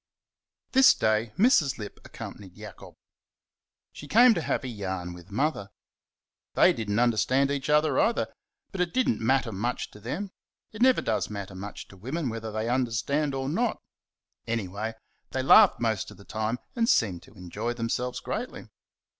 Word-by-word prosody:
This 265 0 +7
day, 110 +1 +1
Mrs. 190 - +4
Lipp 105 -2 -8
accompanied 95 -3 -10
Jacob. - - -11 1.0
She 145 - -10
came 235 - +7
to 170 - -2
have - - -1
a - - -4
"yarn" 95 -6 -4
with 90 +1 -13
Mother. 105 -2 -1 0.9
They - - +6
did 110 -2 -5
n't 105 +2 +1
understand 125 +4 +2
each 140 0 -3
other 150 -2 +3
either; 230 +1 +1 0.4
but 190 - -3
it 180 +3 -1
did 255 -1 +2
n't 110 - 0
matter 130 0 +1
much 115 +5 -3
to 105 - -14
them 170 - -5 0.4
it 215 - -9
never 260 0 +5
does - - -1
matter 100 -2 -6
much 100 +2 -8
to 100 - -14
women 130 - -3
whether 115 -1 -5
they 110 +1 -2
understand 130 +4 0
or 135 0 -2
not; 220 - 0 0.7
anyway, 110 0 -3 0.4
they 130 - -1
laughed 205 +9 +7
most 110 -4 -1
of - - -13
the 100 - -15
time 110 +2 -2 0.2
and 230 -1 +1
seemed 95 - +2
to - - -18
enjoy 100 +6 -4
themselves 120 +1 -2
greatly. - - -5
120 Hz, 170 wpm, -27 LUFS, 105-150 Hz, 1.0 s, This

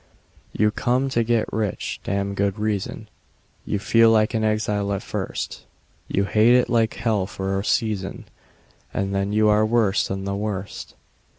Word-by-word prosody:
You 105 0 +2
come 125 +5 0
to 120 -3 +1
get 115 -1 0
rich 105 -3 -2
(damned 100 0 -2
good 100 -1 0
reason); 105 -2 -3 0.6
You - - 0
feel 115 +3 +4
like 110 -1 +3
an 110 -1 0
exile 105 -2 0
at 100 - -3
first; - - -5 0.4
You 100 - 0
hate 110 +4 +4
it 125 - +2
like 115 -2 +2
hell 105 -5 0
for 95 0 -2
a - - -3
season, 105 -3 -1 0.7
And 100 0 -2
then 100 +1 0
you 110 +1 +3
are 105 0 +4
worse 110 -3 +2
than 95 0 -4
the 100 0 -2
worst. 100 -2 -5
105 Hz, 165 wpm, -23 LUFS, 100-110 Hz, 0.7 s, feel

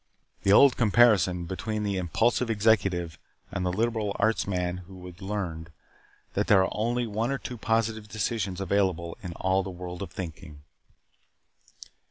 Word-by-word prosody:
The 100 - +2
old 130 +5 +7
comparison 105 -6 +4
between 105 +4 -3
the 100 -2 -1
impulsive 115 +8 +1
executive 100 -6 +1 0.3
and 90 - -3
the 90 - 0
liberal 110 0 -1
arts 110 0 +1
man 90 -2 -1
who 95 -2 -11
has 90 +2 -11
learned 90 -5 -4 0.6
that - - 0
there 95 -3 +6
are - - -2
only 120 +3 0
one 110 +2 -2
or 135 - 0
two 125 - -7
positive 115 -1 -1
decisions 105 -3 -2
available 95 -3 0
in 90 -4 -6
all 95 +2 +1
the 95 - -6
world 90 0 -7
of 100 - -4
thinking. 80 -4 -8
100 Hz, 155 wpm, -27 LUFS, 90-110 Hz, 0.6 s, old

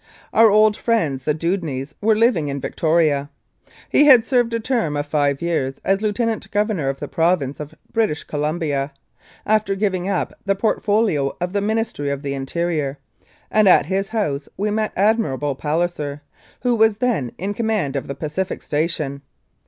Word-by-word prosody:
Our 225 0 +7
old 215 +1 +5
friends 160 - 0
the 150 - +2
Dewdneys 160 -5 -2
were 220 +1 +3
living 215 -9 +2
in 140 0 -3
Victoria. 155 -2 +1 0.6
He 295 - +4
had 255 -6 +7
served 245 -3 +2
a - - 0
term 225 - -1
of 145 - -2
five 145 -1 0
years 140 -6 -1
as 195 +1 +2
Lieutenant 220 +1 -1
Governor 205 -9 0
of 135 - -4
the - - -5
Province 165 -5 0
of 150 -1 -8 0.2
British 215 -9 0
Columbia, 150 -2 -2 0.5
after 215 -2 +1
giving 190 -2 -1
up 195 -3 -1
the 195 0 +1
port 215 +3 0
folio 205 -10 +1
of 180 +1 -3
the 200 - +1
Ministry 220 -8 -1
of 140 0 -3
the 140 -1 -2
Interior, 145 +1 -2 0.5
and 215 -2 +5
at - - +6
his 195 +3 -1
house 150 -11 -2
we 210 +2 -1
met 215 0 0
Admiral 185 - +1
Palliser, 150 0 -2 0.4
who 245 -1 +2
was 220 -2 +3
then 220 - 0
in 195 +4 -3
command 210 -10 -1
of 140 - -3
the 140 - -5
Pacific 155 +7 -4
Station. 150 -2 -2
175 Hz, 170 wpm, -21 LUFS, 145-215 Hz, 0.6 s, Our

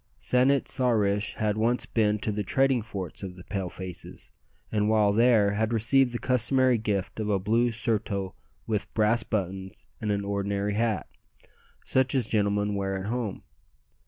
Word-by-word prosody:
San 125 +1 +3
it 140 -1 +2
sa 130 -2 +1
rish 105 -2 +1
had 105 0 -1
once 120 +3 +1
been 105 -2 +1
to 105 - -2
the 105 0 -2
trading 135 +4 +2
forts 100 -6 -7
of 95 -2 -6
the 90 - -12
Pale 95 -2 -4
faces, 90 -1 -9 0.4
and 105 -1 +1
while 105 -2 +3
there 110 -2 +4
had 110 +2 0
received 125 +3 +3
the 120 - -3
customary 125 0 +2
gift 100 -2 -2
of 105 -1 -2
a 100 - +2
blue 115 +5 +1
surtout 105 -4 -2 0.3
with 105 -2 -2
brass 110 +2 +3
buttons, 95 -3 -4 0.2
and 105 -1 -1
an 100 -1 -1
ordinary 100 0 -1
hat, 110 -1 0 0.8
such 130 0 +1
as 130 -4 +2
gentlemen 105 -1 0
wear 95 -1 -2
at 95 +2 -5
home. 120 -5 -3
105 Hz, 170 wpm, -27 LUFS, 100-115 Hz, 0.8 s, there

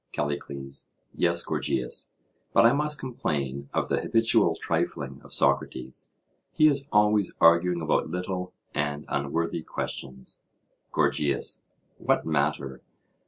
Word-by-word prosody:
CALLICLES: 70 -2 -4 0.2
Yes, 85 0 +1
Gorgias, 65 -2 -1 0.4
but - - +6
I 115 - +7
must 150 +1 +1
complain 70 - -3
of - - 0
the - - 0
habitual 115 0 +3
trifling - - -2
of - - -15
Socrates; 65 +1 0 0.4
he 155 - +4
is 140 -1 +1
always 105 -1 +3
arguing 85 +1 +5
about 80 0 +1
little 90 +1 -3 0.2
and 75 0 -1
unworthy 80 +4 -1
questions. 65 -4 -6 0.5
GORGIAS: 70 -2 +1 0.4
What - - +1
matter? 70 -3 -1
80 Hz, 115 wpm, -27 LUFS, 70-100 Hz, 0.5 s, I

